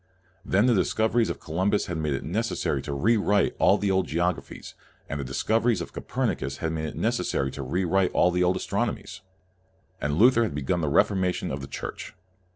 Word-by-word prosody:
Then 100 +3 +2
the 125 - +4
dis 95 -5 +1
coveries 110 +1 +2
of - - -4
Columbus 95 +6 0
had 85 - -4
made 75 -2 -1
it 65 - -5
neces 110 +9 -2
sary - - -1
to - - -6
re 110 +11 +3
write 105 0 +2
all - - +5
the 100 -1 0
old 95 -2 +1
geographies, 85 +2 -3 0.3
and 70 - -4
the - - -2
discoveries 110 - +1
of 85 - -7
Copernicus 70 +1 -2
had 80 - -2
made 80 -1 -3
it 75 - -6
necessary 65 0 -1
to 70 - -7
re 90 +8 -1
write 95 +2 +2
all 90 - +3
the 90 0 +1
old 90 +1 +2
astronomies. 95 0 -3 0.8
And 75 +1 -1
Luther 120 +3 +6
had 110 -11 -1
begun 75 +5 -1
the 75 - 0
Reformation 95 +2 +1
of 70 +1 -4
the 70 - -7
Church. - - -7
90 Hz, 205 wpm, -26 LUFS, 75-105 Hz, 0.8 s, Luther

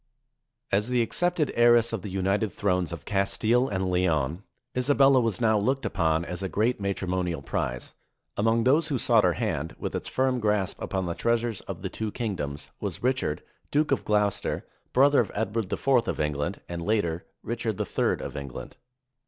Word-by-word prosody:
As 105 +4 +1
the 125 -1 +3
accepted 175 +4 +1
heiress 120 -1 +5
of 110 - -2
the 100 - -6
united 95 +2 0
thrones 90 -4 0
of 85 - -7
Castile 110 +5 +1
and 95 -2 -1
Leon, 85 -3 +1 0.3
Isabella 135 0 +4
was 115 -5 0
now 110 -3 +3
looked 130 +6 0
upon 80 -1 +1
as 90 +2 -4
a 95 - -2
great 110 +3 0
matrimonial 90 -5 -2
prize. 60 -2 -3 0.4
Among 115 +2 +2
those 145 +7 +3
who 140 - 0
sought - - +4
her - - +3
hand, 80 +4 -2
with - - -4
its - - -4
firm 130 -1 +1
grasp 105 -4 0
upon 95 -1 -2
the 85 - -2
treasures 115 +1 0
of - - -6
the - - -2
two 110 -1 -3
kingdoms, 80 - -4
was 100 -1 -5
Richard, 125 -12 0 0.3
Duke 150 +1 +1
of 140 - +1
Gloucester, 105 -1 0 0.3
brother 140 +2 +5
of 110 - +1
Edward 110 -1 -2
IV - - -4 0.2
of - - -2
England, 75 -1 -2
and 85 -1 -5
later 85 -4 0 0.2
Richard 115 -2 -3
III 105 - 0
of - - -7
England. 70 -3 -7
105 Hz, 175 wpm, -27 LUFS, 90-120 Hz, 0.4 s, heiress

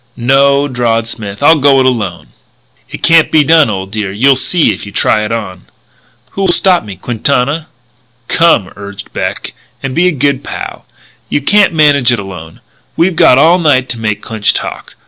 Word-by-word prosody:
"No," 140 +3 +2
drawled 120 -3 -1
Smith, 105 -1 -7
"I'll 160 +1 +5
go 135 -1 +4
it 130 - +2
alone." 105 -9 -2 0.6
"It - - -10
can't 165 -1 +4
be 155 -1 +4
done, 160 -2 +4
old 95 -2 -5
dear. 105 -3 -4
You'll 130 +7 +2
see 130 -1 +1
if - - -9
you 100 - -9
try 105 +1 +1
it 105 - -4
on." 100 -6 -6 0.7
"Who'll 195 -1 -2
stop 180 0 +2
me? 100 -3 -9
Quintana?" 135 - -2 0.6
"Come," 165 - +2
urged 100 0 -10
Beck, - - -4 0.3
"and 135 -1 -4
be 175 +5 +2
a - - +2
good 140 -2 -1
pal. - - -8 0.4
You - - 0
can't 200 +6 +2
manage 145 -5 +3
it 120 - 0
alone. 90 -5 -10 0.4
We've 175 +1 +1
got 125 - +4
all 165 +6 +4
night 130 -6 +1
to 120 - -4
make 105 -2 -3
Clinch 110 -2 0
talk. - - -6
130 Hz, 180 wpm, -11 LUFS, 105-150 Hz, 0.7 s, I'll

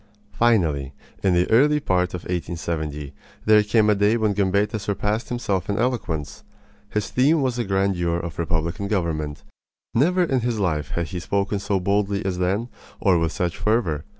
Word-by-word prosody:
Finally, 80 - +2 0.3
in 95 -2 +2
the 90 +1 +3
early 150 +6 +5
part 90 -8 0
of 90 - -5
1870, 80 -4 -4 0.3
there 110 0 +6
came 105 +1 +2
a 105 - +5
day 105 +3 +3
when 110 -2 +1
Gambetta 100 +2 +1
surpassed 105 +2 -2
himself 115 -8 -2
in 100 - 0
eloquence. 85 - -2 0.5
His 105 -1 -2
theme 140 +4 +3
was 125 -2 0
the 120 - -1
grandeur 95 -3 0
of 85 -2 -6
republican 85 +3 -1
government. 80 -7 -2 0.5
Never 180 +9 +3
in 135 -6 +1
his 120 -1 -1
life 80 -6 -1
had 85 -2 -1
he 90 - -4
spoken 100 +3 -1
so 100 0 0
boldly 100 +2 0
as 90 -2 -2
then, 100 +6 0 0.3
or 95 -4 +3
with 80 -1 0
such 90 -4 -2
fervor. 100 -10 +1
100 Hz, 170 wpm, -23 LUFS, 85-110 Hz, 0.5 s, there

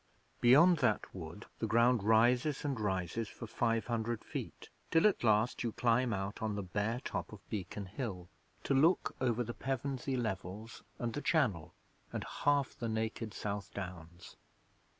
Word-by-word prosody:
Beyond 155 +9 +7
that 125 -6 +1
wood 85 +3 -8
the 110 - -1
ground 115 +1 +4
rises 120 +7 +3
and 135 -5 -1
rises 95 +2 -1
for 115 - -8
five 115 0 0
hundred 115 -1 -2
feet, - - -6 0.2
till 165 +2 +4
at 210 -10 +3
last 110 +1 +3
you 115 -2 -2
climb 120 +1 +2
out 100 0 -3
on 110 -2 -1
the 100 - -3
bare 105 +6 -1
top - - -4
of - - -12
Beacon 100 0 -4
Hill, 95 -3 -5 0.4
to - - +1
look 160 +7 +3
over 120 -2 +1
the 120 +1 -5
Pevensey 135 0 -2
Levels 110 -1 -4 0.2
and 120 -1 -2
the 145 - -3
Channel 110 - +1 0.4
and - - -3
half 145 -2 +1
the 115 -2 -3
naked 110 0 -2
South 100 0 -4
Downs. 90 -3 -8
115 Hz, 160 wpm, -34 LUFS, 100-125 Hz, 0.4 s, Beyond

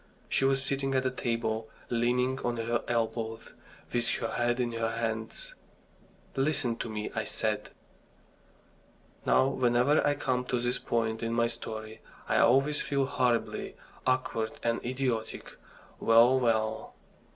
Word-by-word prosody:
She 135 - +2
was 135 0 +2
sitting 135 0 -1
at 130 - +2
the 130 - 0
table, 115 -3 -2 0.2
leaning 125 +2 +1
on 120 -2 -2
her 115 +1 -1
elbows, 115 -1 -2 0.4
with 120 0 +1
her 115 - -2
head 120 +1 +1
in 120 -1 0
her 115 -1 -1
hands. 115 - -3 0.8
"Listen 135 -4 +1
to - - -4
me," 105 -1 -4
I - - -1
said. - - -2 1.6
Now, 130 - +5
whenever 125 +2 +3
I 145 0 +2
come 130 -3 0
to 125 -1 0
this 120 +1 -1
point 110 -1 -1
in 115 0 -1
my 115 0 +3
story, 110 -2 -5 0.3
I - - +3
always 135 +4 +4
feel 140 -1 +1
horribly 125 -4 0 0.3
awkward 130 -3 0
and 115 0 0
idiotic. 125 -2 -2 0.4
Well, 120 +3 +6
well! 110 -2 0
120 Hz, 140 wpm, -30 LUFS, 115-130 Hz, 1.6 s, Well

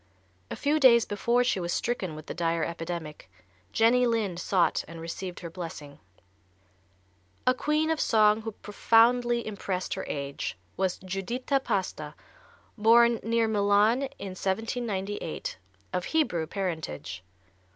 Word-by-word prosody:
A - - -4
few 300 +2 +1
days 235 -4 +6
before 235 +4 +1
she 245 -6 +1
was 175 -1 -3
stricken 190 -9 -2
with 155 0 -9
the - - -5
dire 165 -1 0
epidemic 165 - -6 0.4
Jenny 245 +2 +4
Lind 210 -7 -1
sought 180 -1 +1
and 165 +1 -9
received 175 +2 -6
her 170 - -6
blessing. 160 -5 -8 1.5
A 255 - +5
queen 305 +4 0
of 320 - 0
song 215 -1 +4
who 220 0 -5
profoundly 235 +3 +3
impressed 195 -3 -3
her - - -4
age 140 -8 -4 0.2
was 190 -2 0
Giuditta 235 +9 -1
Pasta, 155 - -2 0.6
born 235 +2 +5
near 230 0 +1
Milan 205 +2 +3 0.2
in 195 - -6
1798, 200 -1 -3 0.3
of 180 0 -1
Hebrew 180 - 0
parentage. 160 - -4
205 Hz, 130 wpm, -28 LUFS, 170-235 Hz, 1.5 s, days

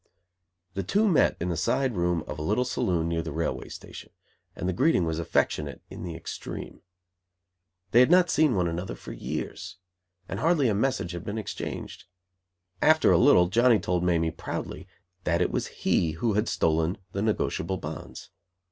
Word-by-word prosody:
The 95 - -2
two 205 - +2
met 180 - +3
in 90 - -2
the 85 - -1
side 120 - 0
room 85 -2 0
of - - -6
a - - -4
little 105 +10 +1
saloon 85 -9 0
near 85 0 0
the 80 -1 -5
railway 80 +2 -3
station; - - -10 0.4
and 90 - -3
the 95 - 0
greeting 130 - +3
was 80 0 -2
affectionate 75 -3 -1
in - - -8
the 85 -2 -5
extreme. 80 - -7 1.1
They 120 - +6
had 125 - +6
not 180 0 +5
seen 150 -6 +3
one 90 -2 +1
another 85 +3 -4
for - - -10
years! - - -5 0.5
And 95 - -4
hardly 155 -3 +3
a - - +2
message 100 -5 0
had 85 -1 -6
been 105 +1 -4
exchanged. 110 - -6 0.8
After 155 +1 +5
a - - +6
little 115 -10 +6
Johnny 120 +3 +5
told 90 -2 -1
Mamie, 85 -2 +2
proudly, - - -6 0.4
that 85 0 +1
it 90 - +1
was - - -1
he 80 -2 0
who 105 +7 0
had 105 +3 +1
stolen 80 +2 +1
the 100 - -3
negotiable 95 -3 -1
bonds. 75 -2 -8
90 Hz, 175 wpm, -27 LUFS, 85-120 Hz, 1.1 s, They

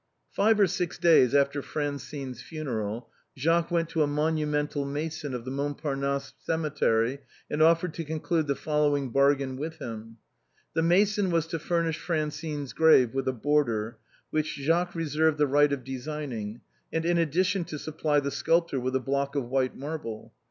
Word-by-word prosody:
Five 215 +1 +3
or 200 - +7
six 175 -1 -2
days 145 -6 +5
after 140 0 +2
Francine's 140 -3 -4
funeral, 120 -8 -4 0.3
Jacques 165 +5 +2
went 170 -2 +1
to 160 - 0
a 150 - +3
monumental 150 -1 0
mason 145 0 -4
of 120 -1 -6
the 130 - -4
Montparnasse 140 0 -2
cemetery 140 -6 0 0.3
and 150 - 0
offered 165 +1 +4
to 165 - -4
conclude 160 +1 -1
the 140 - +1
following 145 -2 0
bargain 140 0 +2
with 160 +3 -5
him. 115 -2 -7 0.6
The 165 - +1
mason 195 +4 +3
was 165 -2 +1
to 165 -1 -2
furnish 165 -1 0
Francine's 150 -3 -3
grave 155 -7 +5
with 135 -1 -2
a - - +3
border, 120 -4 0 0.3
which 155 0 -1
Jacques 170 +5 0
reserved 160 -1 +1
the 150 - +4
right 145 +1 +4
of 140 -3 -2
designing, 130 -5 -5 0.3
and 160 0 -1
in 175 0 +2
addi 165 +2 +2
tion 185 0 0
to 155 - -6
supply 150 0 0
the 140 0 -2
sculptor 165 -3 +1
with 130 +1 -2
a - - +3
block 140 +2 -1
of 130 -4 -2
white 130 0 0
marble. 140 -7 -6
150 Hz, 165 wpm, -27 LUFS, 135-160 Hz, 0.6 s, or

